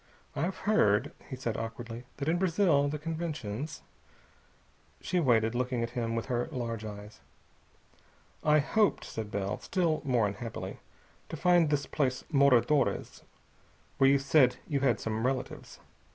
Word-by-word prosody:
"I've 175 +6 -1
heard," 105 - +2 0.2
he 130 - -4
said 120 -3 -3
awkwardly, 115 +1 -6
"that 140 - -4
in 170 +2 +2
Brazil 170 -6 +3
the 150 - -3
conventions...." 155 -5 -5 1.2
She 180 - -1
waited, 115 -7 +3
looking 125 -1 -1
at 115 - -3
him 115 -2 -2
with 115 - -2
her 120 -2 -1
large 115 -5 -4
eyes. 105 0 -9 1.2
"I 150 0 +5
hoped," 205 +8 +2
said 110 -2 -5
Bell, 100 0 -2
still 170 -5 0
more 125 -6 +2
unhappily, 105 +3 -5 0.5
"to 165 - -5
find 175 -1 +4
this 145 -1 0
place 130 -4 -1
Moradores, 140 -1 +3 0.8
where 135 - +6
you 140 - +5
said 135 -2 +4
you 140 - 0
had 130 -5 +2
some 110 0 -2
relatives. 130 +1 -3
130 Hz, 140 wpm, -30 LUFS, 115-155 Hz, 1.2 s, where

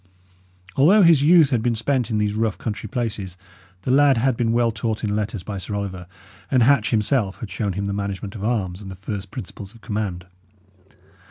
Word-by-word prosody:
Although 185 +10 +6
his 165 -5 +6
youth 155 -1 +6
had 120 -4 +2
been 120 0 0
spent 125 +1 0
in 110 - 0
these 105 -1 0
rough, 110 -1 -1
country 105 -1 -5
places, 105 -7 -4 0.5
the 125 - -1
lad 140 -1 +5
had 130 +2 +2
been 115 -1 0
well 120 0 +2
taught 110 0 -3
in 105 -1 0
letters 105 -2 -3
by 100 -1 -5
Sir 100 +2 -4
Oliver, 95 -3 -5 0.4
and 125 -3 +4
Hatch 130 -3 +4
himself 105 -2 +1
had 105 - -7
shown 100 +1 -2
him 100 +2 -3
the 100 - -2
management 100 0 -4
of 100 - -7
arms 105 -5 -1
and 100 - -8
the 95 - -7
first 95 +1 -6
principles 100 +3 -9
of 115 - -17
command. 100 -3 -3
110 Hz, 200 wpm, -22 LUFS, 100-120 Hz, 0.5 s, Although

